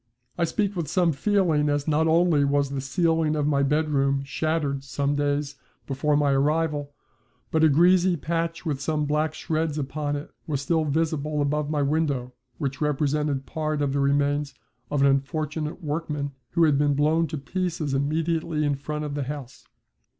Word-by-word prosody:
I 170 - +1
speak 200 +3 -1
with 170 -4 -2
some 175 +2 +2
feeling, 160 -2 +2
as 145 0 -1
not 155 +1 +2
only 165 -2 +4
was 140 0 +1
the 140 -1 -2
ceiling 160 +2 +1
of 150 -1 0
my 145 -2 +2
bedroom 140 -1 +1
shattered 145 -1 -1
some 140 +1 -1
days 145 0 -1 0.3
before 145 +2 +1
my 145 -1 +2
arrival, 145 +1 +1 0.6
but 160 0 +2
a 160 - +7
greasy 175 +4 +4
patch 165 +3 -2
with 145 -4 -2
some 150 0 0
black 150 +1 0
shreds 155 -1 -2
upon 145 +1 -2
it 145 +1 -6 0.2
was 145 -4 -1
still 160 +3 +1
visible 155 0 -1
above 145 +1 0
my 150 -2 0
window 140 -4 0 0.2
which 135 0 -3
represented 150 -1 0
part 155 -1 -2
of 140 -2 0
the 140 - 0
remains 145 +1 +1 0.3
of 145 - 0
an - - +6
unfortunate 150 +4 -1
workman, 150 -2 -3 0.2
who 170 -1 +3
had 150 -3 +4
been 145 -1 +2
blown 155 +3 +2
to 155 - -4
pieces 165 -1 -2
immediately 155 +2 0
in 145 - +2
front 150 +2 -4
of 145 - -4
the 145 -2 -2
house. 140 -4 -8
150 Hz, 170 wpm, -25 LUFS, 140-160 Hz, 0.6 s, a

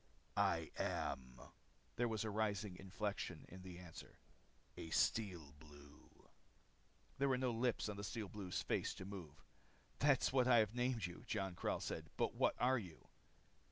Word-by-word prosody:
"I - - +2
am" 65 -1 -2 0.6
there 120 +1 +2
was 110 -2 0
a 110 - -1
rising 105 -2 0
inflection 95 -4 -3
in 95 +1 -10
the 90 -1 -8
answer 90 -2 -10 0.6
"a 80 - -6
Steel 85 -6 +1
Blue." 75 -1 -16 0.9
There 140 0 +4
were 130 - +4
no 125 -1 +1
lips 120 0 +1
on 105 -1 -4
the 100 - -4
Steel 110 0 -3
Blue's 95 -3 -3
face - - 0
to 95 - -7
move. 95 -7 -8 0.6
"That 145 -3 +5
is - - +2
what 130 -2 +5
I 125 -2 +8
have 110 -1 +4
named 120 -4 +1
you," 85 0 -7
Jon 95 -1 -1
Karyl - - 0
said. - - -3
"But - - +2
what - - +3
are 130 +1 +4
you?" 90 -7 -10
100 Hz, 165 wpm, -41 LUFS, 90-115 Hz, 0.9 s, I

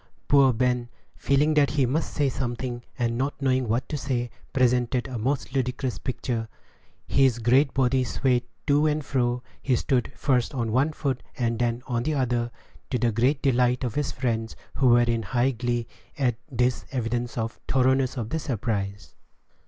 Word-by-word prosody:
Poor 140 -2 +6
Ben, 125 0 0 0.3
feeling 145 +3 +2
that 145 -2 +4
he 140 -3 +2
must 145 +6 -1
say 145 -2 +1
something, 120 -1 -3 0.2
and 120 -1 0
not 135 +2 -2
knowing 130 -2 +1
what 115 +4 0
to - - -3
say, 125 -4 -2 0.2
presented 125 -1 +2
a 125 -3 -5
most 130 +3 -1
ludicrous 130 -1 -1
picture. 120 -3 -3 0.6
His 135 -3 +3
great 130 +4 +3
body 130 -1 +3
swayed 125 0 +1 0.2
to 145 +2 +3
and 150 -1 0
fro; 125 -2 0 0.2
he 130 - +2
stood 125 +1 0
first 130 -1 +1
on 115 -3 -1
one 135 +7 +2
foot 140 -4 -2 0.2
and 115 -2 0
then 120 0 0
on 120 -2 -1
the 155 +5 -1
other, 120 -3 0 0.4
to 125 - 0
the 120 0 +1
great 125 +6 +1
delight 125 -1 +2
of 120 -4 -2
his 145 +1 -1
friends, 115 -3 -2 0.2
who 130 0 +2
were 120 0 +6
in 120 -1 +1
high 125 +4 +1
glee 120 -1 -2 0.3
at 130 -4 +2 0.2
this 125 0 +1
evidence 120 -1 -2
of 115 0 -2
the - - -2
thoroughness 130 0 +2
of 115 -3 -3
the 160 - 0
surprise. 105 - -3
125 Hz, 175 wpm, -26 LUFS, 120-135 Hz, 0.6 s, Poor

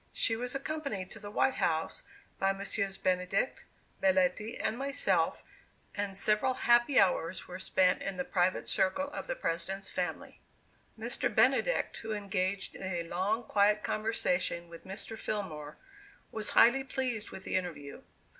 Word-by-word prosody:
She 225 - +2
was 250 +3 -2
accompanied 275 -10 -3
to 220 - -9
the 205 -1 -8
"White 260 +5 +1
House" 160 -1 0 0.4
by 195 0 +2
Messrs 195 0 -2
Benedict, 185 +6 0 0.4
Belletti 190 +4 +2
and 220 - 0
myself, 275 +2 +1 0.5
and 200 -2 -2
several 215 +6 +2
happy 240 +3 +5
hours 180 -1 +1
were 180 0 -7
spent 185 -1 +2
in 195 -1 -3
the 180 - -2
private 180 0 +1
circle 280 +10 +1
of - - -6
the - - -2
President's 195 - -3
family. 175 -3 -4 0.6
Mr. - - -1
Benedict, - - +2
who 220 -1 -4
engaged 195 -2 -2
in - - -10
a 180 -3 -2
long 190 +7 -1
quiet 210 -1 +3
conversation 180 -5 0
with 170 0 -12
Mr. 220 +3 -5
Fillmore, 155 -8 -4 0.5
was 220 -1 -2
highly 265 +3 +7
pleased 250 -5 -2
with 190 - -9
the - - -3
interview. 160 -6 -4
195 Hz, 145 wpm, -31 LUFS, 185-225 Hz, 0.6 s, highly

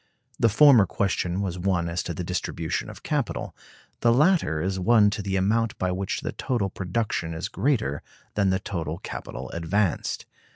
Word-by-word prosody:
The 115 - +4
former 120 -2 +7
question 95 -1 -1
was 90 -3 -3
one 90 -2 0
as 85 +1 -1
to 85 - -4
the 90 - -3
distribution 85 -2 -3
of - - -11
capital; - - -2 0.4
the 120 - +4
latter 145 - +3
is 95 +3 -1
one 110 +3 +5
as - - +5
to 105 - -3
the 95 -1 -2
amount 110 +4 +1
by 95 -1 0
which 95 +1 -2
the - - -3
total 110 -7 -1
production 90 -3 -2
is 80 - -3
greater 105 - 0 0.3
than 100 -2 +2
the 95 - +2
total 85 -5 -4
capital - - -7
advanced. 85 +3 -1
95 Hz, 175 wpm, -25 LUFS, 85-110 Hz, 0.4 s, former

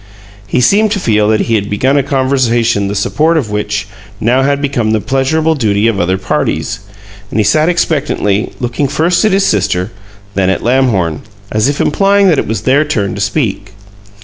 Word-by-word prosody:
He 125 - 0
seemed 210 - +3
to 200 - -2
feel 105 - +1
that 110 0 +2
he 115 - -1
had 100 -2 0
begun 130 +7 +1
a 140 - +3
conversation 125 -6 0
the 100 - -3
support 155 +11 +1
of 120 -9 -2
which 105 -1 -2 0.3
had - - -5
now 135 +3 +2
become 135 -6 -1
the 110 - +1
pleasurable 135 +8 0
duty 110 -6 +1
of 110 -4 0
other 90 +2 0
parties; 95 +4 -2 0.5
and - - -2
he - - +3
sat 155 - +2
expectantly, 145 - 0
looking 125 +3 -1
first 165 - +1
at 215 - +2
his 195 +1 +2
sister, 95 - 0 0.4
then 95 -1 +1
at 95 - -1
Lamhorn, 115 - +1 0.3
as 110 +5 +1
if 145 - -3
implying 195 +4 +3
that 160 - +2
it - - -2
was 110 +2 -2
their 140 +3 +2
turn 105 -11 -2
to 100 - -5
speak. 105 -2 -2
120 Hz, 190 wpm, -13 LUFS, 105-145 Hz, 0.5 s, seemed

